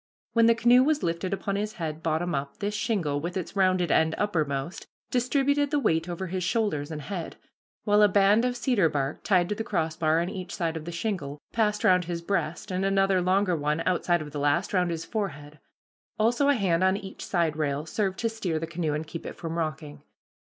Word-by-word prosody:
When 230 -1 +5
the 230 - +5
canoe 240 +2 +5
was 300 +1 +1
lifted 170 +3 -1
upon 200 0 -2
his 210 +1 -2
head 160 -2 -5
bottom 165 +2 -1
up, 140 0 -3
this 205 0 -2
shingle, 180 -10 -1
with 175 +4 -3
its 185 +1 -5
rounded 185 -2 +2
end 160 0 +3
uppermost, 155 -5 -2 0.2
distributed 280 +3 +1
the 295 - +1
weight 165 - +1
over 175 +2 -4
his 185 0 -3
shoulders 175 -8 0
and 155 -2 -6
head, 180 -2 -5 0.5
while 210 -1 +4
a 210 - +7
band 205 +3 +4
of 250 0 0
cedar 240 -9 +2
bark, 140 -1 -3
tied 180 -3 +3
to - - +1
the 225 - -4
crossbar 160 -5 0
on 170 - -1
each 185 -1 -6
side 165 -2 -1
of 160 -1 -6
the 170 - -5
shingle, 170 -6 -3
passed 210 -2 +1
round 180 -1 +4
his 170 0 -4
breast, 170 -2 -2
and 185 +1 -1
another 195 -1 +2
longer 185 0 +2
one, 150 +1 -1
outside 175 -2 +1
of 150 - -10
the 145 - -4
last, 145 +8 +1
round 180 -2 +2
his 165 -1 -4
forehead; 150 -9 -5 0.6
also 235 +6 +2
a 285 - +5
hand 185 -6 +1
on 190 +1 +3
each 195 -2 -8
side 170 -4 0
rail 150 -1 -1
served 190 +3 -1
to 230 - 0
steer 200 -8 -2
the 160 - -2
canoe 165 -2 -2
and 155 +1 -3
keep 165 +1 -7
it - - -7
from 165 -1 -5
rocking. 155 -2 -4
180 Hz, 215 wpm, -27 LUFS, 160-205 Hz, 0.6 s, a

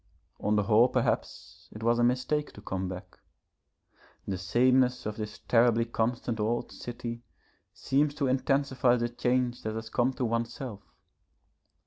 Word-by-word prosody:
On 105 - +1
the 105 - +2
whole 110 +4 +5
perhaps - - -2
it 110 - -9
was 120 +1 +3
a - - +3
mistake 130 +5 +1
to 105 - -12
come 95 -2 -3
back. 90 0 -9 1.1
The 95 -2 -2
sameness 125 +6 +2
of 105 0 -3
this 105 -1 -6
terribly 115 -1 +3
constant 115 0 -1
old 115 +3 -1
city 120 -1 -6 0.5
seems 145 +2 0
to 145 - 0
intensify 130 -1 +2
the 120 -1 -1
change 125 0 0
that 110 0 -4
has 110 0 -6
come 125 +1 +2
to 130 -1 -2
oneself. 115 -1 -3
120 Hz, 145 wpm, -29 LUFS, 110-125 Hz, 1.1 s, whole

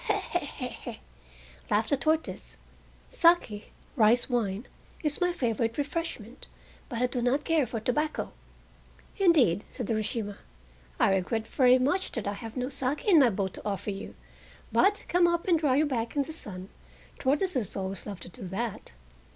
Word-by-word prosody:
"He - - +2
he - - -6
he - - -5 0.3
he!" - - -14 0.7
laughed 215 +5 +1
the - - +5
tortoise; 315 +3 -1 0.5
"sake 335 - +2 0.2
(rice 235 0 +4
wine) 225 -3 -1 0.4
is 300 +2 0
my 355 0 +3
favorite 230 -6 -1
refreshment, 285 -6 -4 0.4
but 240 -1 -1
I - - +5
do 250 0 -2
not 260 +5 +1
care 315 -6 +2
for 230 0 -3
tobacco." 300 +7 -1 0.9
"Indeed," 275 - +4
said 245 - -6
Urashima, 215 -1 -2 0.6
"I - - +4
regret 220 +4 0
very 255 0 +5
much 290 +9 0
that 230 - -3
I 200 - 0
have 225 +3 -8
no 250 0 -1
"sake" 275 +1 -2
in 375 -7 +7
my 260 -4 +6
boat 190 -2 -2
to - - -8
offer 200 0 -2
you, 195 +1 -7 0.6
but 410 +2 +3
come 350 0 +4
up 340 +1 0
and 340 -3 +4
dry 285 -5 +2
your 300 +3 +4
back 235 -4 -2
in 285 - +2
the 315 - -8
sun—tortoises 260 - -3
always 190 0 -4
love 200 -3 -6
to - - -6
do 190 0 -9
that." 200 - -4
245 Hz, 165 wpm, -29 LUFS, 210-300 Hz, 0.9 s, in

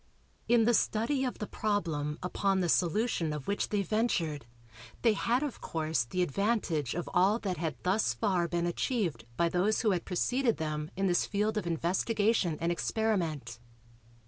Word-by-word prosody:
In 235 -2 +4
the 240 - +4
study 235 +5 +1
of 250 - -3
the 210 - -4
problem 165 -10 -1
upon 195 +1 +1
the 175 -2 0
solution 175 -1 +1
of 150 -3 -5
which 200 - -1
they 205 -2 0
ventured, 170 - -1 0.6
they 230 -2 +5
had 240 +6 +1
of 290 -4 -5
course 155 -5 -1
the 180 +9 0
advantage 175 - 0
of 175 - -3
all 190 +5 +4
that 190 -6 -3
had 160 -1 -2
thus 190 +4 +2
far 185 -6 +1
been 170 0 -1
achieved 175 - -1
by 170 - +3
those 185 +5 +1
who 220 - +3
had 180 -3 0
preceded 245 +6 +1
them 155 -1 -3
in 195 +1 0
this 175 -2 +2
field 210 +1 0
of 210 -5 -2
investigation 185 +2 +1
and 170 +1 0
experiment. 170 - -1
185 Hz, 170 wpm, -30 LUFS, 165-215 Hz, 0.6 s, they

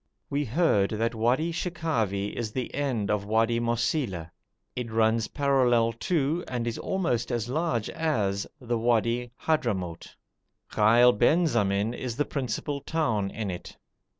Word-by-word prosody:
We 145 +1 +1
heard 115 - +2
that 115 +2 -1
Wadi 125 +9 +1
Shekhavi 130 - -1
is 115 -3 -3
the 130 -2 -3
end 125 -8 -1
of 105 -1 0
Wadi 115 +3 +2
Mosila. 115 - -1 0.4
It 125 -2 -4
runs 110 0 +2
parallel 125 -5 +2 0.2
to, 165 0 +1
and 120 -2 -3
is 115 -1 -3
almost 125 -12 -1
as 120 -2 -1
large 145 -6 0
as, 105 -11 -1
the 120 -2 -2
Wadi 120 +1 +1
Hadhramout. 100 - -1 0.6
Ghail 120 +4 +5
Benzamin 110 - +2
is 125 -2 -4
the 145 +3 0
principal 140 +2 -3
town 120 -13 0
in 105 -2 -4
it. 90 - -8
120 Hz, 135 wpm, -27 LUFS, 110-140 Hz, 0.6 s, Ghail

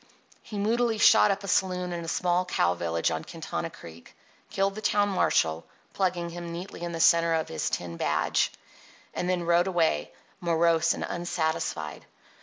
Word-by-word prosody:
He 210 - -8
moodily 225 +2 +1
shot 210 - +6
up 200 0 -1
a - - -6
saloon 180 -2 0
in 170 -1 -4
a - - -7
small 180 +1 +1
cow 90 - +1
village 85 -1 -1
on - - -3
Quintana - - -5
Creek, 85 0 -13 0.3
killed 195 0 0
the 215 - -7
town 205 -1 +2
marshal 80 - +1 0.3
(plugging 175 -3 -1
him 170 0 -7
neatly 175 +2 -7
in 175 0 -3
the 165 - -5
centre 170 0 +4
of 160 - -2
his 80 - -2
tin 85 -1 -4
badge), 75 -1 +1 0.6
and 180 - -2
then 180 -1 0
rode 170 +2 +3
away, 165 - +1 0.3
morose 170 -1 +2
and - - -5
unsatisfied. 160 - -3
170 Hz, 170 wpm, -27 LUFS, 160-185 Hz, 0.6 s, shot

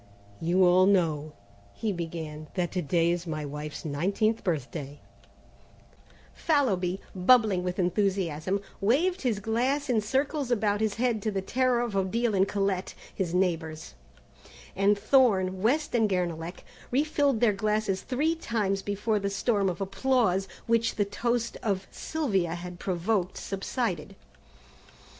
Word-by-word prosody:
"You 180 +3 +3
all 180 +1 +5
know," 155 -6 +1 0.4
he 220 - -1
began, 160 -3 -5
"that 180 -2 -1
to 180 - -1
day 170 +2 +2
is 175 0 -3
my 155 -2 -3
wife's 150 +2 -6
nineteenth 195 +9 0
birthday 145 -3 -3 0.7
" - - -28
Fallowby, 195 - +2
bubbling 200 0 +4
with 180 0 -3
enthusiasm, 185 -1 0 0.2
waved 320 - +2
his 235 -6 0
glass 255 +7 0
in 225 -3 +2
circles 270 +5 -1
about 210 -3 +1
his 215 -2 0
head 235 -2 0
to 215 - -1
the 195 -2 -2
terror 255 +2 +1
of 235 -4 -3
Odile 215 +4 +1
and 195 0 +3
Colette, 195 -2 -1 0.2
his 180 -3 -2
neighbours, 165 - -1 0.8
and 200 +1 +3
Thorne, 200 -5 +3
West 290 +8 +1
and 225 -3 +3
Guernalec 175 -2 -2 0.3
refilled 285 -2 +1
their 220 -3 +4
glasses 210 -1 0
three 295 +6 0
times 215 -10 -1
before 205 +2 -1
the 200 0 -1
storm 200 -1 +1
of 180 - -4
applause 195 -1 +1 0.2
which 230 0 +1
the 205 - +1
toast 235 +3 -1
of 195 -4 -1
Sylvia 195 - -1
had 175 0 -8
provoked, 185 +1 -1
subsided. 195 - -3
195 Hz, 140 wpm, -28 LUFS, 180-230 Hz, 0.8 s, all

